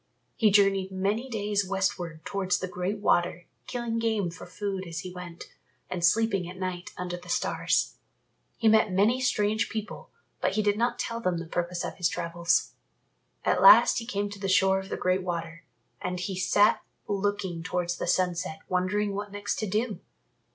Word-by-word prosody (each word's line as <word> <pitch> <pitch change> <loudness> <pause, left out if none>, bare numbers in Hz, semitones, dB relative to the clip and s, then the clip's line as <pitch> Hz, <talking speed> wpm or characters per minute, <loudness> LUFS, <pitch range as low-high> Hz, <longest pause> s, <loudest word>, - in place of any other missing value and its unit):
He 220 - +4
journeyed 195 -2 +3
many 205 +7 -1
days 205 -3 0
westward 185 -4 -2
towards 190 -2 0
the 185 - -4
Great 180 +3 -3
Water, 175 -3 +1 0.2
killing 235 -2 -2
game 220 -6 0
for 175 - -10
food 190 +1 -4
as 165 -1 -5
he 185 -1 -8
went, 180 -2 -9 0.4
and 180 -2 -3
sleeping 195 -1 +2
at 180 - -9
night 185 -1 -4
under 180 -1 -4
the 175 - -14
stars. - - 0 0.6
He 230 - +1
met 220 -2 +5
many 210 +7 +3
strange 215 -4 +1
people, 215 -1 -6 0.3
but - - 0
he 215 - +1
did 205 0 +2
not 235 +3 0
tell 230 -1 -3
them 180 -5 0
the 170 - -5
purpose 175 +1 -2
of - - -6
his 180 -3 +2
travels. 170 +1 0 0.7
At - - +2
last - - +8
he 230 - -8
came 205 -3 -1
to 205 - -8
the 195 -1 -2
shore 190 +1 +4
of 190 0 -8
the - - -3
Great 185 +1 +1
Water, 170 -2 -5 0.4
and 180 0 -3
he 185 +1 -3
sat 205 +3 +3 0.3
looking 200 -4 -1
towards 175 0 -2
the - - -3
sunset 170 -3 0
wondering 195 +3 0
what 205 0 -5
next 205 0 -3
to 215 - -2
do. 215 +3 -1
190 Hz, 180 wpm, -27 LUFS, 180-205 Hz, 0.7 s, last